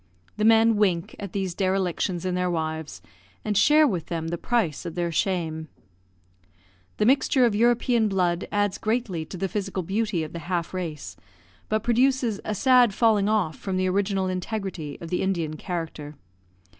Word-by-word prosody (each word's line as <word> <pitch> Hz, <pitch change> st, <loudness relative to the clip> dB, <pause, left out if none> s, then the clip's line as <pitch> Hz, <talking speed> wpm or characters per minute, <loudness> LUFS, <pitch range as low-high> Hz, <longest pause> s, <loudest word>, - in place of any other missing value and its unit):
The 215 Hz, -, +1 dB
men 225 Hz, 0 st, +5 dB
wink 180 Hz, -5 st, +1 dB
at 200 Hz, -3 st, -6 dB
these 190 Hz, -2 st, -2 dB
derelictions 185 Hz, -1 st, -1 dB
in 185 Hz, -, -1 dB
their 180 Hz, 0 st, 0 dB
wives, 160 Hz, -, -4 dB, 0.4 s
and 210 Hz, -, -1 dB
share 300 Hz, +9 st, +5 dB
with 180 Hz, -, -2 dB
them 165 Hz, -1 st, -3 dB
the 170 Hz, -, -2 dB
price 220 Hz, -, 0 dB
of 165 Hz, -, -6 dB
their 175 Hz, -1 st, -1 dB
shame. 160 Hz, -3 st, -1 dB, 1.3 s
The 210 Hz, -, +2 dB
mixture 265 Hz, +1 st, +4 dB
of 230 Hz, -, +2 dB
European 235 Hz, +1 st, +2 dB
blood 180 Hz, -3 st, 0 dB
adds 205 Hz, -1 st, 0 dB
greatly 215 Hz, -8 st, -1 dB
to 180 Hz, -, -8 dB
the 195 Hz, -, -1 dB
physical 195 Hz, -1 st, -3 dB
beauty 200 Hz, -1 st, -1 dB
of 155 Hz, -, -8 dB
the 170 Hz, -, -5 dB
half 175 Hz, -1 st, -2 dB
race, 165 Hz, -5 st, -5 dB, 0.5 s
but 215 Hz, 0 st, 0 dB
produces 240 Hz, -2 st, +2 dB
a 215 Hz, -, -3 dB
sad 250 Hz, -2 st, +4 dB
falling 215 Hz, -3 st, +3 dB
off 200 Hz, -8 st, 0 dB
from 190 Hz, -2 st, -3 dB
the 185 Hz, 0 st, +1 dB
original 195 Hz, 0 st, 0 dB
integrity 185 Hz, -5 st, -4 dB
of 165 Hz, -, -8 dB
the 180 Hz, -, 0 dB
Indian 170 Hz, -5 st, -1 dB
character. 155 Hz, -3 st, -5 dB
190 Hz, 170 wpm, -25 LUFS, 170-215 Hz, 1.3 s, men